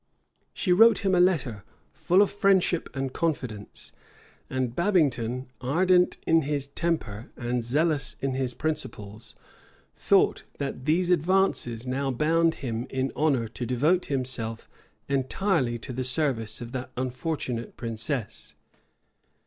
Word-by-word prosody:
She 180 Hz, -, +1 dB
wrote 225 Hz, +2 st, +6 dB
him 190 Hz, -, +3 dB
a 180 Hz, -, +4 dB
letter, 150 Hz, -, +1 dB, 0.3 s
full 185 Hz, +3 st, +4 dB
of 205 Hz, -, -2 dB
friendship 195 Hz, -4 st, +2 dB
and 135 Hz, -1 st, -3 dB
confidence; 125 Hz, -11 st, -3 dB, 0.6 s
and 130 Hz, -2 st, -2 dB
Babington, 130 Hz, -, +1 dB
ardent 180 Hz, +7 st, +3 dB
in 165 Hz, 0 st, +4 dB
his 145 Hz, -1 st, -1 dB
temper 140 Hz, -8 st, -3 dB
and 120 Hz, 0 st, -2 dB
zealous 145 Hz, +3 st, 0 dB
in 135 Hz, -1 st, -1 dB
his 130 Hz, -2 st, -2 dB
principles, 110 Hz, -9 st, -5 dB, 0.6 s
thought -, -, +2 dB
that 135 Hz, -2 st, -4 dB
these 175 Hz, +4 st, +2 dB
advances 170 Hz, -9 st, +2 dB
now 135 Hz, +2 st, -1 dB
bound 165 Hz, +5 st, +2 dB
him 115 Hz, 0 st, -3 dB
in 130 Hz, 0 st, -1 dB
honor 140 Hz, -7 st, +1 dB
to 120 Hz, -, -6 dB
devote 145 Hz, +10 st, +2 dB
himself 125 Hz, -4 st, -3 dB, 0.4 s
entirely 135 Hz, -1 st, 0 dB
to 125 Hz, +3 st, -7 dB
the 130 Hz, +1 st, -2 dB
service 125 Hz, -5 st, 0 dB
of 120 Hz, 0 st, -7 dB
that 130 Hz, -1 st, -5 dB
unfortunate 130 Hz, -1 st, -3 dB
princess. 115 Hz, +1 st, -3 dB
135 Hz, 125 wpm, -26 LUFS, 120-165 Hz, 0.6 s, wrote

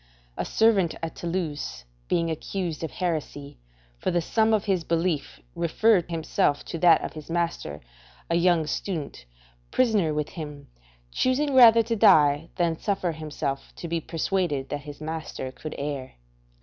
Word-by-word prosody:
A -, -, -3 dB
servant 205 Hz, -7 st, +3 dB
at 165 Hz, -, -4 dB
Toulouse 165 Hz, -, -4 dB, 0.2 s
being 165 Hz, -1 st, +1 dB
accused 165 Hz, 0 st, -4 dB
of 160 Hz, -, -2 dB
heresy, 155 Hz, -, -4 dB, 0.4 s
for -, -, -1 dB
the 175 Hz, -1 st, +2 dB
sum 220 Hz, +6 st, +2 dB
of 215 Hz, -2 st, +2 dB
his 190 Hz, -4 st, +1 dB
belief 165 Hz, -, -1 dB
referred 180 Hz, +2 st, +2 dB
himself 160 Hz, -3 st, 0 dB
to 165 Hz, -, -5 dB
that 170 Hz, -2 st, +5 dB
of -, -, -5 dB
his 155 Hz, 0 st, -10 dB
master, 165 Hz, -, -2 dB, 0.5 s
a -, -, -1 dB
young 170 Hz, -1 st, +3 dB
student, 155 Hz, -, -4 dB, 0.4 s
prisoner 215 Hz, -10 st, +2 dB
with 150 Hz, 0 st, -2 dB
him, 150 Hz, -3 st, -8 dB, 0.4 s
choosing 275 Hz, -, +1 dB
rather 230 Hz, -3 st, +8 dB
to 230 Hz, +1 st, -1 dB
die 160 Hz, -7 st, +5 dB
than 170 Hz, -3 st, 0 dB
suffer 195 Hz, -4 st, -1 dB
himself 150 Hz, -3 st, -5 dB
to 170 Hz, -, -6 dB
be 165 Hz, 0 st, -1 dB
persuaded 165 Hz, -4 st, -1 dB
that 145 Hz, -, -3 dB
his 145 Hz, +1 st, -10 dB
master 155 Hz, -4 st, -5 dB
could 155 Hz, +3 st, -8 dB
err. 140 Hz, -2 st, -4 dB
165 Hz, 150 wpm, -26 LUFS, 150-185 Hz, 0.5 s, rather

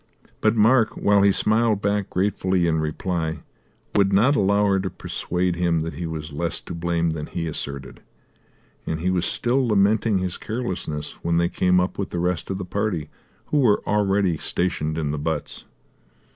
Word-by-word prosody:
But 110 Hz, +1 st, +2 dB
Mark, 115 Hz, +1 st, +4 dB
while 100 Hz, 0 st, +3 dB
he 100 Hz, 0 st, +5 dB
smiled 110 Hz, +1 st, +2 dB
back 100 Hz, -1 st, 0 dB
gratefully 95 Hz, -1 st, +1 dB
in 80 Hz, -1 st, +1 dB
reply, 80 Hz, +1 st, -2 dB, 0.5 s
would 100 Hz, -1 st, +3 dB
not 115 Hz, +9 st, +4 dB
allow 100 Hz, -1 st, +3 dB
her 100 Hz, -1 st, +2 dB
to 95 Hz, 0 st, -2 dB
persuade 90 Hz, 0 st, -2 dB
him 85 Hz, -2 st, +1 dB
that 80 Hz, 0 st, -4 dB
he 85 Hz, +3 st, -4 dB
was 80 Hz, -2 st, -6 dB
less 85 Hz, +2 st, -1 dB
to -, -, -8 dB
blame 85 Hz, 0 st, 0 dB
than 75 Hz, -1 st, -5 dB
he 85 Hz, -, -4 dB
asserted, 70 Hz, -3 st, -5 dB, 0.9 s
and 80 Hz, 0 st, -2 dB
he 90 Hz, +2 st, +1 dB
was 90 Hz, -1 st, 0 dB
still 125 Hz, +1 st, +1 dB
lamenting 105 Hz, 0 st, +3 dB
his 90 Hz, -1 st, -2 dB
carelessness 90 Hz, -10 st, -4 dB
when 85 Hz, 0 st, +1 dB
they 85 Hz, 0 st, +2 dB
came 90 Hz, 0 st, +2 dB
up 90 Hz, +2 st, -2 dB
with 100 Hz, -, -2 dB
the -, -, -4 dB
rest 90 Hz, -1 st, -1 dB
of 95 Hz, -, -2 dB
the 95 Hz, -, -5 dB
party, 90 Hz, -6 st, -2 dB, 0.4 s
who 150 Hz, -, +3 dB
were 115 Hz, -7 st, +3 dB
already 100 Hz, -4 st, +1 dB
stationed 80 Hz, -2 st, -2 dB
in 75 Hz, -3 st, -1 dB
the 75 Hz, -, -3 dB
butts. 75 Hz, 0 st, -4 dB
90 Hz, 180 wpm, -23 LUFS, 80-100 Hz, 0.9 s, he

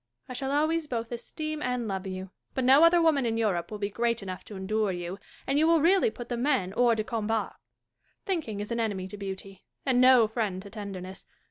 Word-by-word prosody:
I -, -, -6 dB
shall 270 Hz, +2 st, -3 dB
always 310 Hz, +2 st, +1 dB
both 230 Hz, -3 st, -3 dB
esteem 310 Hz, +6 st, -5 dB
and 250 Hz, -4 st, -1 dB
love 190 Hz, -1 st, -3 dB
you; 185 Hz, 0 st, -6 dB, 0.2 s
but 260 Hz, -, 0 dB
no 270 Hz, +5 st, +7 dB
other 340 Hz, +1 st, +6 dB
woman 320 Hz, -5 st, +3 dB
in 225 Hz, -1 st, 0 dB
Europe 200 Hz, -7 st, 0 dB
will 215 Hz, -, -5 dB
be 205 Hz, 0 st, -3 dB
great 235 Hz, 0 st, 0 dB
enough 185 Hz, -1 st, -6 dB
to 210 Hz, -, -9 dB
endure 205 Hz, +2 st, 0 dB
you, 175 Hz, +2 st, -5 dB, 0.3 s
and 275 Hz, +2 st, +1 dB
you 315 Hz, -, +4 dB
will 335 Hz, 0 st, +5 dB
really 375 Hz, +8 st, +4 dB
put 240 Hz, -, -9 dB
the 240 Hz, -, -3 dB
men 240 Hz, -8 st, +1 dB
hors 240 Hz, -2 st, +4 dB
de 215 Hz, -, -1 dB
combat. 225 Hz, -2 st, -2 dB, 0.7 s
Thinking 315 Hz, -, -2 dB
is 210 Hz, -, -6 dB
an 235 Hz, -, -1 dB
enemy 200 Hz, -5 st, -1 dB
to 205 Hz, -, -7 dB
beauty, 195 Hz, -1 st, -7 dB, 0.2 s
and 255 Hz, -2 st, +3 dB
no 255 Hz, -3 st, +7 dB
friend 215 Hz, -4 st, -2 dB
to 200 Hz, -, -11 dB
tenderness. 195 Hz, -3 st, -7 dB
230 Hz, 220 wpm, -28 LUFS, 200-270 Hz, 0.7 s, no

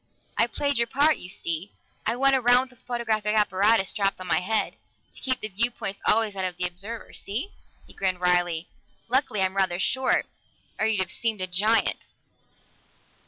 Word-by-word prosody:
I -, -, +3 dB
played 285 Hz, -4 st, 0 dB
your 235 Hz, -, +2 dB
part, 290 Hz, +5 st, +3 dB
you 180 Hz, -, -8 dB
see; 170 Hz, +1 st, -3 dB, 0.3 s
I -, -, +1 dB
went 270 Hz, +2 st, +4 dB
around 250 Hz, +1 st, +4 dB
with 250 Hz, -, -21 dB
the -, -, -22 dB
photographic 220 Hz, -3 st, -1 dB
apparatus 205 Hz, 0 st, +3 dB
strapped 195 Hz, -3 st, -1 dB
on 185 Hz, -, -7 dB
my 175 Hz, -, +2 dB
head, 215 Hz, +4 st, -1 dB, 0.4 s
to -, -, -14 dB
keep 260 Hz, -1 st, 0 dB
the 215 Hz, -, -2 dB
viewpoint 205 Hz, -1 st, -1 dB
always 220 Hz, -1 st, +3 dB
that 190 Hz, -1 st, -3 dB
of 180 Hz, -1 st, -3 dB
the 180 Hz, -, 0 dB
observer. 195 Hz, +6 st, -6 dB
See?" 235 Hz, -, -4 dB, 0.3 s
He -, -, -16 dB
grinned 185 Hz, -2 st, -1 dB
wryly. 175 Hz, -2 st, +2 dB, 0.4 s
"Luckily 250 Hz, -6 st, +2 dB
I'm 190 Hz, 0 st, 0 dB
rather 185 Hz, -3 st, +2 dB
short, 260 Hz, +7 st, +1 dB, 0.5 s
or 220 Hz, -, +2 dB
you'd 215 Hz, -3 st, +2 dB
have 185 Hz, -, -2 dB
seemed 225 Hz, -3 st, -2 dB
a -, -, +1 dB
giant." 205 Hz, +5 st, +1 dB
210 Hz, 180 wpm, -25 LUFS, 185-235 Hz, 0.5 s, went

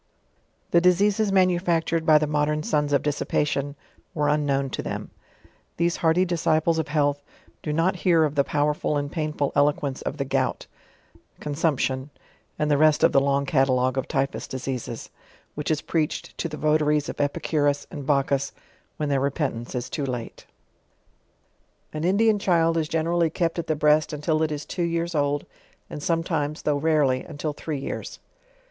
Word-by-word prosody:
The 170 Hz, -, +5 dB
diseases 200 Hz, +4 st, +3 dB
manufactured 175 Hz, -3 st, +2 dB
by 155 Hz, -1 st, +7 dB
the 150 Hz, -, +1 dB
modern 150 Hz, 0 st, 0 dB
sons 150 Hz, -2 st, 0 dB
of 140 Hz, -, +2 dB
dissipa 150 Hz, 0 st, 0 dB
tion, 145 Hz, 0 st, -2 dB, 0.4 s
were 150 Hz, -2 st, +1 dB
unknown 140 Hz, -2 st, +1 dB
by -, -, -3 dB
them. -, -, -5 dB, 0.7 s
These 170 Hz, 0 st, +1 dB
hardy 170 Hz, +3 st, +3 dB
disciples 165 Hz, -1 st, +1 dB
of 160 Hz, -, -2 dB
health, 145 Hz, -1 st, +1 dB, 0.4 s
do 150 Hz, -, -3 dB
not 170 Hz, +5 st, +1 dB
hear 170 Hz, -2 st, +3 dB
of 150 Hz, -2 st, 0 dB
the 140 Hz, -2 st, +3 dB
powerful 150 Hz, +1 st, 0 dB
and 145 Hz, 0 st, -3 dB
painful 150 Hz, -3 st, -1 dB
eloquence 145 Hz, -2 st, +1 dB
of 150 Hz, -, -4 dB
the 140 Hz, -, -2 dB
Gout, 135 Hz, -, -1 dB, 0.7 s
Consumption, 145 Hz, -3 st, -1 dB, 0.5 s
and 150 Hz, 0 st, 0 dB
the 145 Hz, -, +4 dB
rsst 155 Hz, 0 st, +4 dB
of -, -, +6 dB
the -, -, +5 dB
long 140 Hz, 0 st, +1 dB
catalogue 130 Hz, -2 st, +2 dB
of 135 Hz, -, -1 dB
54 -, -, -30 dB
JOURNAL -, -, +2 dB
OF 135 Hz, -, -5 dB
Typhut -, -, -7 dB
diseases, 125 Hz, -3 st, -5 dB, 0.4 s
which 150 Hz, -, -4 dB
is 155 Hz, -2 st, 0 dB
preached 155 Hz, -3 st, -2 dB
to 170 Hz, -, -2 dB
the 150 Hz, -, -6 dB
votaries 150 Hz, -1 st, +2 dB
of -, -, -4 dB
Epi 145 Hz, 0 st, 0 dB
curus 145 Hz, -2 st, 0 dB
and 140 Hz, -2 st, -7 dB
liacchus, 140 Hz, -1 st, +1 dB, 0.4 s
when 150 Hz, -1 st, -2 dB
their 140 Hz, -1 st, +2 dB
repentence 135 Hz, -4 st, -2 dB
ia 125 Hz, -, 0 dB
too 140 Hz, +2 st, -4 dB
late. 120 Hz, -3 st, -6 dB, 1.5 s
An 155 Hz, 0 st, -4 dB
Indian 205 Hz, +4 st, +3 dB
child 165 Hz, -4 st, +2 dB
is 160 Hz, -2 st, 0 dB
generally 165 Hz, +1 st, +1 dB
kept 165 Hz, +1 st, -1 dB
at 165 Hz, -, -4 dB
the 155 Hz, -, +1 dB
breast 150 Hz, +1 st, +3 dB
until 155 Hz, +1 st, 0 dB
it 160 Hz, -1 st, +1 dB
is 150 Hz, 0 st, -4 dB
two 180 Hz, -, -4 dB
years 170 Hz, 0 st, -1 dB
old, 145 Hz, -1 st, 0 dB, 0.5 s
and 150 Hz, -, -6 dB
sometimes, 160 Hz, -2 st, -1 dB
though 150 Hz, -1 st, +1 dB
rarely, 145 Hz, -4 st, +2 dB
until 150 Hz, 0 st, -4 dB
three 150 Hz, 0 st, -4 dB
years. 135 Hz, -, -5 dB
150 Hz, 175 wpm, -25 LUFS, 145-165 Hz, 1.5 s, by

